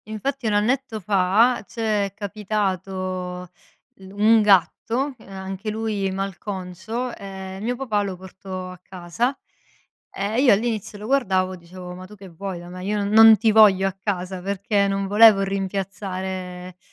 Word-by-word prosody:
Infatti 245 +4 -3
1 215 - +1
annetto 225 +2 0
fa 205 +5 +2
c'è 215 -4 -1
capitato 185 -3 -3 0.5
l 190 -1 -13
un 215 +3 +4
gatto, 225 +7 +2
ehm, - - -17
a 190 -1 -7
anche 190 +2 -5
lui 215 -2 -2
malconcio, 195 +4 -5
ehm, 190 -1 -8
mio 245 +2 -1
papà 235 -5 -1
lo 195 -2 -3
portò 185 0 -8
a 185 - -12
casa. 190 +9 -3 0.7
Ehm, 200 +3 -3
io 260 -4 +6
all'inizio 215 -1 -2
lo 210 - -9
guardavo 190 -8 +1
e - - -8
dicevo: 180 +1 -10
"Ma 185 +1 -10
tu 210 - -13
che 195 -2 -12
vuoi 185 +2 -6
da 175 0 -11
me? 180 +1 -8
Io 210 +2 -1
non 200 -1 -1
non 220 +1 +8
ti 220 0 +3
voglio 200 -3 +6
a 195 - -3
casa!" 190 -2 -3
Perché 200 +2 0
non 195 0 -1
volevo 210 0 +7
rimpiazzare 190 -2 -4
195 Hz, 160 wpm, -23 LUFS, 185-215 Hz, 0.7 s, non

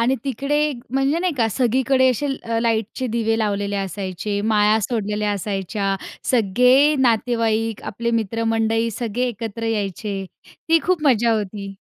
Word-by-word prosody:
आणि 245 +3 +3
तिकडे 275 +2 -1
एक 285 -5 -2 0.2
म्हणजे 270 +4 +2
नाही 360 -1 0
का, 230 -4 +2
सगळीकडे 260 +3 +2
असे 270 +4 -2 0.2
अ, 230 0 -1
लाईटचे 230 +2 -1
दिवे 225 -1 +1
लावलेले 205 -1 -1
असायचे, 195 +1 -3
माळा 215 0 +3
सोडलेल्या 210 -1 -1
असायच्या, 195 0 -2 0.4
सगळे 250 +6 +4
नातेवाईक, 225 -2 +1
आपले 235 +3 -3
मित्रमंडळी 225 +1 0
सगळे 240 +3 -2
एकत्र 225 0 -5
यायचे. 200 -2 -2 0.4
ती 330 0 +6
खूप 360 -3 +1
मजा 235 -3 +4
होती. 200 -2 -4
225 Hz, 135 wpm, -21 LUFS, 205-250 Hz, 0.4 s, ती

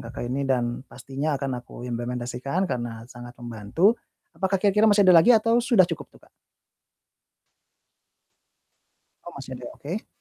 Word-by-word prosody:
Kakak 120 0 -7
ini, 135 +3 -2
dan 120 -2 0
pastinya 140 +3 -3
akan 130 -3 -3
aku 120 0 -11
implementasikan 125 +7 -3
karena 120 -6 -4
sangat 120 0 -11
membantu. 120 - +1 0.4
Apakah 195 0 0
kira-kira 210 +3 +3
masih 205 -1 +5
ada 185 -1 +7
lagi 235 - +4
atau 230 +2 +2
sudah 235 -6 +4
cukup - - -6
tuh, - - -21
Kak? - - -26 3.0
Oh 175 - -9
masih 135 -1 -8
ada, 125 0 -9
oke. 175 +9 -6
135 Hz, 140 wpm, -25 LUFS, 120-190 Hz, 3.0 s, ada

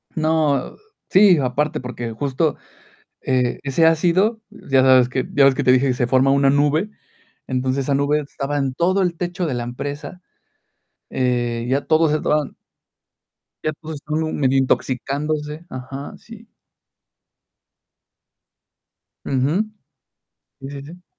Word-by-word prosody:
No. 155 -4 0 0.3
Sí, 190 -2 +6
aparte 140 +4 -1
porque 120 -2 -5
justo, 140 +6 -1 0.6
eh, 125 -2 0
ese 140 +4 +2
ácido, 180 +7 +2
ya 135 -11 0
sabes, 130 -1 +5
que 130 0 -2
ya 145 - +4
ves 135 - +5
que 145 - -1
te 125 - +6
dije 130 +2 +3
que 130 - +2
se 125 -1 -1
forma 130 +2 +3
una 140 0 +3
nube, 145 +7 +2 0.6
entonces 130 +1 -1
esa 140 - 0
nube 145 +2 +1
estaba 145 0 -4
en 135 -2 -1
todo 185 +7 +1
el 180 -2 0
techo 175 +1 -3
de 150 - -2
la 120 -1 -3
empresa, 145 +8 -6 0.9
eh, 120 -2 -1
ya 135 +2 0
todos 160 -1 +3
estaban 150 -1 0 1.1
ya 155 - -1
todos 160 0 -8
estaban 155 +2 -3
medio 135 -1 +2
intoxicándose, 150 +4 -1
ajá, 135 +2 -7
sí. 230 0 -14 2.8
Ujú. 150 +11 0 0.9
Sí, 135 0 -8
sí, 140 -1 -7
sí. 175 +5 -13
145 Hz, 135 wpm, -21 LUFS, 130-160 Hz, 2.8 s, Sí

